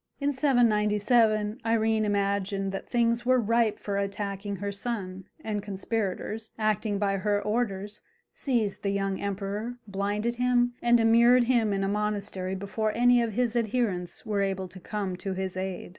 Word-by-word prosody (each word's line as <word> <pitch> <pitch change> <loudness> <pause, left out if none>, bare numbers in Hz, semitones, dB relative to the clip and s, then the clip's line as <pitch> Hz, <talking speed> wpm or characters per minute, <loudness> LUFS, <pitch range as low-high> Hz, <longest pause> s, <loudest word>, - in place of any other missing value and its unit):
In 285 0 +1
797 220 -4 +2
Irene 220 -1 +2
imagined 200 -1 0
that 195 - -6
things 235 0 +1
were 255 +1 +4
ripe 230 -1 +2
for 200 -1 -3
attacking 200 0 -3
her 200 +1 -4
son, 195 -3 -4 0.2
and 210 -2 -2
conspirators, 210 +2 -3
acting 215 -1 0
by 195 -1 0
her 205 +1 +1
orders, 210 -2 -2 0.3
seized 230 -7 -1
the 200 - -1
young 195 -1 -1
emperor, 200 +4 -3
blinded 205 +4 -2
him, 245 0 +2
and 240 0 +4
immured 235 +2 +5
him 235 -3 +2
in 195 0 0
a - - 0
monastery 205 -2 -2
before 205 +3 -2
any 245 +1 +5
of 230 -2 -1
his 245 +1 0
adherents 220 -5 -1
were 210 -2 0
able 190 -1 -1
to 185 +2 -11
come 195 0 -3
to 190 +1 -4
his 190 -1 -3
aid. 185 -1 -4
210 Hz, 160 wpm, -27 LUFS, 195-230 Hz, 0.3 s, immured